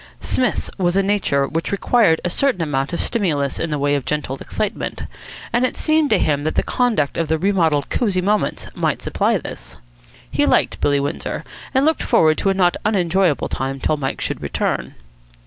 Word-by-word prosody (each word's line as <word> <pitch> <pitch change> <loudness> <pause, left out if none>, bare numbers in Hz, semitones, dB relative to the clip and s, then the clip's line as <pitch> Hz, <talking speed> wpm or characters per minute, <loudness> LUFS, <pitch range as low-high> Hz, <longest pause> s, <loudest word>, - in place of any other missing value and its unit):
Psmith's 255 - -1
was 175 -1 +1
a 195 - +3
nature 190 -9 +1
which 165 +3 -3
required 200 -4 +3
a - - +1
certain 260 -9 +1
amount 135 -1 -1
of 170 - -3
stimulus 155 - 0
in 165 - -1
the 150 - -1
way 145 0 +1
of 140 -2 0
gentle 150 -2 -2
excitement; 210 0 -3 0.5
and 240 +2 +2
it 255 - 0
seemed 310 -2 +2
to 215 - +4
him 145 -4 +1
that 155 - -1
the - - +2
conduct 230 - 0
of 165 - 0
the 160 +1 +1
remodelled 165 -6 +1
Cosy 200 -7 +1
Moments 205 +3 0
might - - -1
supply - - +1
this. 65 - -8 0.5
He - - +2
liked - - +2
Billy 145 -1 +2
Windsor, 140 - -3 0.3
and 265 +1 +2
looked 320 +1 +2
forward 155 -1 +3
to 195 - +1
a 195 - +1
not 180 -2 +2
unenjoyable 190 -5 +1
time 135 +1 -3
till 155 - +1
Mike 135 -3 -3
should - - -3
return. - - -2
170 Hz, 190 wpm, -20 LUFS, 145-205 Hz, 0.5 s, to